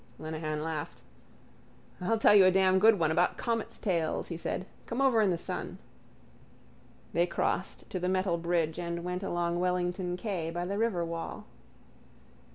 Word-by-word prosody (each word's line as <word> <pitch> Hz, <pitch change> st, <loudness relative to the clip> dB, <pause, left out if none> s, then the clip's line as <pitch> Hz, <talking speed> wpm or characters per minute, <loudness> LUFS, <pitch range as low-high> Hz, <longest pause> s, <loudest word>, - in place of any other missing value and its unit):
Lenehan 155 Hz, -1 st, -4 dB
laughed. 155 Hz, -2 st, -5 dB, 1.0 s
—I'll 225 Hz, +5 st, +1 dB
tell 215 Hz, -, +6 dB
you 200 Hz, -2 st, +8 dB
a -, -, +7 dB
damn 190 Hz, 0 st, +4 dB
good 220 Hz, +1 st, +6 dB
one 160 Hz, -3 st, +2 dB
about 175 Hz, +3 st, +2 dB
comets' 230 Hz, -1 st, -2 dB
tails, 170 Hz, -5 st, -1 dB
he 170 Hz, -, -4 dB
said. 170 Hz, +2 st, -3 dB, 0.2 s
Come 235 Hz, -, -3 dB
over 260 Hz, -5 st, +4 dB
in 205 Hz, -, +3 dB
the 175 Hz, -, +1 dB
sun. -, -, -5 dB, 1.4 s
They 170 Hz, +2 st, +3 dB
crossed 180 Hz, +1 st, -2 dB
to 185 Hz, -, -2 dB
the 180 Hz, +1 st, -1 dB
metal 185 Hz, -2 st, +1 dB
bridge 170 Hz, -1 st, 0 dB
and 170 Hz, 0 st, -3 dB
went 180 Hz, +1 st, -3 dB
along 175 Hz, -2 st, -1 dB
Wellington 180 Hz, 0 st, -1 dB
quay 180 Hz, -5 st, -3 dB
by 175 Hz, +1 st, -3 dB
the 200 Hz, +3 st, -2 dB
riverwall. 170 Hz, -7 st, -2 dB
180 Hz, 160 wpm, -30 LUFS, 170-190 Hz, 1.4 s, you